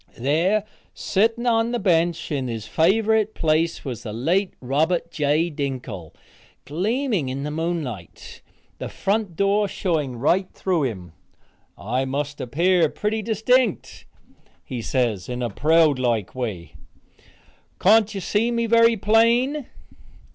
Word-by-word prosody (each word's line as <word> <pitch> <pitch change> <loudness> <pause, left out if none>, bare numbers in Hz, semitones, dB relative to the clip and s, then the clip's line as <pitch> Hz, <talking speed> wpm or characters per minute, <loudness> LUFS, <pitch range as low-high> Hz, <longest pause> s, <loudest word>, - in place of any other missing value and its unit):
There, 165 - +1 0.3
sitting 225 +4 0
on 230 -1 +2
the - - +1
bench, 170 -4 +1
in 135 -3 -1
his 115 -3 -5
favorite 215 +5 +2
place, 160 +1 0
was 120 -4 -5
the 110 - -6
late 170 - 0
Robert 160 +6 0
J. 155 +3 +1
Dinkle, 125 - -5 0.5
gleaming 200 - -1
in 135 +2 -4
the 150 - -3
moonlight, 155 - -5 0.4
the - - -5
front 200 -3 -1
door 200 +3 +2
showing 155 -10 -2
right 175 +10 +1
through 175 -6 0
him. 95 -9 -5 0.7
"I 125 +5 -2
must 145 +2 -3
appear 165 +6 +2
pretty 215 +5 -2
distinct," 225 +1 0 0.6
he 125 -2 -5
says 115 -5 -1
in 125 0 -3
a 120 - -2
proud 155 +2 +3
like 115 -6 0
way. 95 - -5 1.1
"Can't 215 +1 +4
you 195 - -3
see 215 +6 0
me 235 -1 0
very 230 0 +4
plain?" 235 +7 +2
165 Hz, 130 wpm, -23 LUFS, 130-210 Hz, 1.1 s, Can't